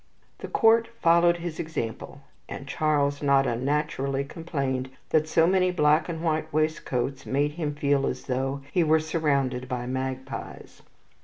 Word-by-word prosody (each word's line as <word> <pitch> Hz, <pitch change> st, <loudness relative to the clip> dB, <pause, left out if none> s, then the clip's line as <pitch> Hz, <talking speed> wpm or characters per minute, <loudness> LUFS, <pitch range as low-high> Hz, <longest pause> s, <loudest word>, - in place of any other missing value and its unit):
The -, -, -6 dB
court 230 Hz, 0 st, +4 dB
followed 170 Hz, +1 st, +4 dB
his 170 Hz, -2 st, -6 dB
example, 140 Hz, -3 st, -5 dB, 0.3 s
and 140 Hz, -, -7 dB
Charles 145 Hz, -1 st, 0 dB
not 140 Hz, -1 st, +3 dB
unnaturally 135 Hz, +2 st, -1 dB
complained 140 Hz, -4 st, -3 dB, 0.2 s
that 155 Hz, 0 st, +3 dB
so 165 Hz, 0 st, +4 dB
many 185 Hz, +1 st, +3 dB
black 155 Hz, -2 st, +2 dB
and 165 Hz, -1 st, -4 dB
white 155 Hz, -1 st, -1 dB
waistcoats 140 Hz, -4 st, -1 dB
made 145 Hz, +2 st, +1 dB
him 150 Hz, -2 st, -3 dB
feel 140 Hz, -1 st, +1 dB
as 130 Hz, -, -4 dB
though 135 Hz, +2 st, -2 dB
he 175 Hz, -, +3 dB
were 160 Hz, 0 st, +4 dB
surrounded 140 Hz, -5 st, -1 dB
by 125 Hz, -2 st, -3 dB
magpies. 130 Hz, +1 st, -5 dB
145 Hz, 145 wpm, -26 LUFS, 135-160 Hz, 0.3 s, court